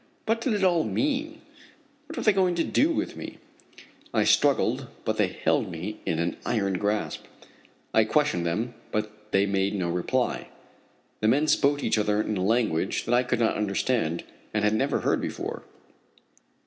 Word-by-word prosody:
What 225 +1 +1
did 240 -1 0
it 205 -2 0
all 175 -4 +4
mean? 300 +3 -1 0.7
What 315 - -8
were - - -2
they 215 - +5
going 185 -2 +2
to 170 - +1
do 300 - +2
with - - -2
me? - - -8 0.8
I - - +4
struggled, 145 -2 +3 0.2
but - - 0
they - - +3
held - - 0
me 90 +6 -6
in 80 - +1
an 85 +1 -1
iron 100 -5 0
grasp. 105 +1 -2 0.7
I 110 - +5
questioned 145 - +1
them, 110 +9 -1 0.2
but 105 0 -4
they 95 +1 +3
made 100 0 0
no 90 -3 -1
reply. 90 0 -1 0.7
The 110 - +1
men 140 +7 +3
spoke 145 -1 +3
to - - -3
each 110 - +2
other 105 0 +1
in 110 0 -1
a 95 - -1
language 105 -5 +1
that 120 - 0
I 120 - +5
could 125 -1 -1
not 115 -1 +2
understand, 100 -4 0 0.3
and 105 - +1
had 105 0 +3
never 135 +6 +1
heard - - +1
before. - - -4
110 Hz, 180 wpm, -26 LUFS, 100-150 Hz, 0.8 s, they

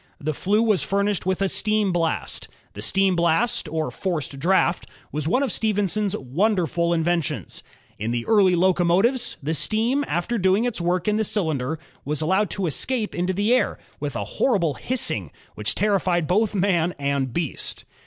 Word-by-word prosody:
The 155 +1 -2
flue 205 +9 +1
was 215 -5 +3
furnished 200 -1 0
with 190 +1 +1
a - - +2
steam 210 0 +1
blast. 165 -2 -2 0.3
The 105 - -8
steam 190 - +2
blast 170 +3 +1
or 155 0 -2
forced 155 -7 -3
draft 175 +2 +2 0.2
was 150 0 -2
one 255 +11 +2
of 275 - -1
Stephenson's 205 -2 0
wonderful 170 - 0
inventions. 165 - -1 0.4
In 110 +2 -2
the 120 0 -2
earlier 195 -5 +4
locomotives, 190 +7 +2
the 155 +3 -1
steam 230 - +1
after 215 +7 -1
doing 190 +4 +3
its 240 -7 -2
work 175 +2 0
in 210 0 +2
the 220 - +1
cylinder 160 -8 0 0.3
was 150 +1 -2
allowed 190 +5 +2
to 195 +2 -2
escape 215 - -1
into 180 +2 -1
the 205 +5 +2
air, 255 - +1 0.2
with - - -4
a - - -2
horrible 185 - +1
hissing 160 - -1 0.2
which 105 - -2
terrified 185 -4 +1
both 210 +5 +1
man 180 -3 +1
and 140 -2 -1
beast. 160 +1 -4
180 Hz, 165 wpm, -23 LUFS, 160-210 Hz, 0.4 s, earlier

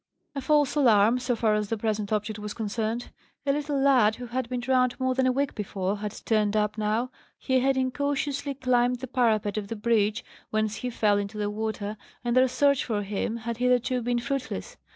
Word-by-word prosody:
A 275 - -4
false 295 0 +3
alarm, 235 -4 +4
so 250 -1 0
far 220 -1 +2
as 210 -1 -1
the 225 - -1
present 215 -1 -2
object 215 0 -1
was 210 0 -6
concerned. 220 +2 -3 0.3
A 280 - +3
little 290 0 -1
lad, 255 -6 +4
who 245 - -7
had 245 0 -3
been 250 -1 -2
drowned 255 0 +1
more 260 0 +1
than 260 0 +2
a - - +4
week 275 +2 0
before, 195 -1 -2
had 210 -1 -5
turned 215 -1 +2
up 210 0 +1
now. 220 +4 -1 0.3
He 260 -1 +1
had 265 +1 +2
incautiously 280 +2 -1
climbed 250 -2 +1
the 260 - -4
parapet 220 -5 +1
of 205 -2 -3
the 230 - -4
bridge, 215 0 +1 0.2
whence 215 0 -1
he 250 - -3
fell 210 -3 +2
into 200 +1 -5
the 205 0 -1
water, 215 -1 -3 0.3
and 240 0 0
their 255 0 +6
search 280 +1 +2
for 210 -4 -2
him 210 +3 -2
had 230 0 -4
hitherto 250 0 +2
been 240 +1 0
fruitless. 275 - -4
235 Hz, 205 wpm, -27 LUFS, 215-255 Hz, 0.3 s, their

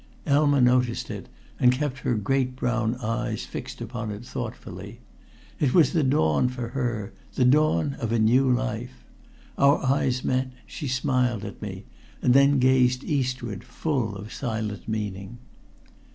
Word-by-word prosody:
Elma 145 -1 +3
noticed 125 -1 +2
it, - - -7 0.3
and 125 - +6
kept 135 0 -2
her 125 - 0
great 130 +4 0
brown 120 -2 0
eyes 115 -2 -3
fixed - - -7
upon 115 -1 -4
it 105 +3 -6
thoughtfully. - - -7 0.6
It 140 -4 +2
was 165 -7 +5
the 165 - +3
dawn 125 - +2
for 125 -2 -5
her 120 -5 -3 0.2
the 125 - +3
dawn 140 - +3
of 115 -2 -2
a 115 - +2
new 125 +5 +4
life. 60 - -3 0.5
Our 140 +1 +6
eyes 130 -1 +1
met; 130 0 0 0.2
she 150 - -6
smiled 125 -4 0
at 100 - -8
me, 95 -2 -6 0.3
and 125 - +3
then 140 +1 +5
gazed 125 0 +3
again - - -2
eastward, 125 -6 -2
full 125 -4 -2
of 105 +2 -8
silent 110 -5 -4
meaning. 105 -1 -4
125 Hz, 150 wpm, -25 LUFS, 110-130 Hz, 0.6 s, and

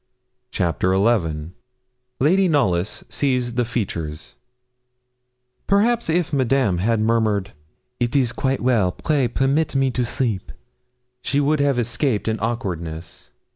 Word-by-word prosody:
CHAPTER 90 - 0
XI 85 -7 +1 0.7
LADY 185 +8 +3
KNOLLYS 105 - +1
SEES 125 -4 0
THE 120 +1 +1
FEATURES 85 -10 -4 1.3
Perhaps, 220 +1 +2
if 170 -1 0
Madame 130 -8 +2
had 115 +4 +1
murmured, 110 -3 +1 0.5
'It 120 +2 -1
is 130 -5 +3
quite 135 +1 -1
well 115 -8 +2
pray 140 - 0
permit 140 +5 0
me 135 -1 +2
to 125 - -1
sleep,' 115 -5 -2 0.7
she 140 - 0
would 145 +1 +2
have 140 -2 +2
escaped 120 -1 -1
an 110 0 0
awkwardness. 85 -8 -5
120 Hz, 120 wpm, -21 LUFS, 95-140 Hz, 1.3 s, LADY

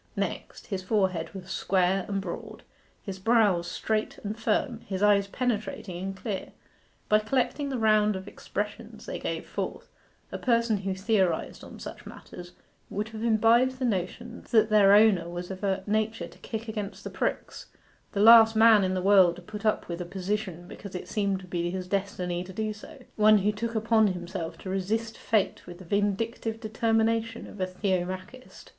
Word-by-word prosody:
Next, - - -4
his 195 -3 -4
forehead 185 -4 0
was 190 0 -8
square 185 0 +1
and 200 -1 -1
broad, 185 -3 -7 0.4
his 195 -2 -6
brows 200 -5 +3
straight 215 0 -2
and 210 +1 -3
firm, 225 +1 0
his 190 0 -2
eyes 200 -1 +4
penetrating 210 -6 -3
and 195 0 -4
clear. 200 -2 -5 0.5
By 215 - +5
collecting 265 +5 -1
the 265 - -2
round 215 -2 +3
of 190 +1 -7
expressions - - -6
they - - -5
gave - - -4
forth, - - -5 0.4
a - - -5
person 235 -3 +2
who 195 -1 -3
theorized 190 -4 0
on - - -11
such - - -9
matters 175 0 -11 0.4
would 210 +2 -3
have 220 -1 -8
imbibed 235 +3 +3
the 255 - -1
notion 225 +3 -3
that 220 -1 +4
their 200 -2 +7
owner 205 -6 +4
was 175 +1 -6
of 190 +1 -8
a 190 -1 0
nature 215 +1 -1
to - - -17
kick 225 0 -6
against 210 -2 -5
the - - -6
pricks; - - -3 0.5
the 200 - 0
last 225 0 +8
man 220 -2 +7
in 185 0 0
the 185 - -2
world 190 -3 +6
to 180 - -12
put 215 +3 -5
up 215 - 0
with 170 0 -5
a - - -4
position 185 -1 -4
because 200 -1 -9
it 180 - -6
seemed 200 -1 -1
to - - -11
be 175 -1 -2
his 185 0 -4
destiny 185 -3 -2
to 185 - -10
do 215 +2 -2
so; 210 - -13
one 215 0 +6
who 205 +1 +2
took 230 +2 -4
upon 220 0 +3
himself 175 -2 -4
to - - -11
resist 215 +4 -2
fate 215 -5 -1
with 175 -1 -9
the 185 - -12
vindictive 205 +4 -1
determination 225 0 0
of 210 - -9
a 185 - +1
Theomachist. 185 +5 -4
205 Hz, 180 wpm, -27 LUFS, 185-220 Hz, 0.5 s, last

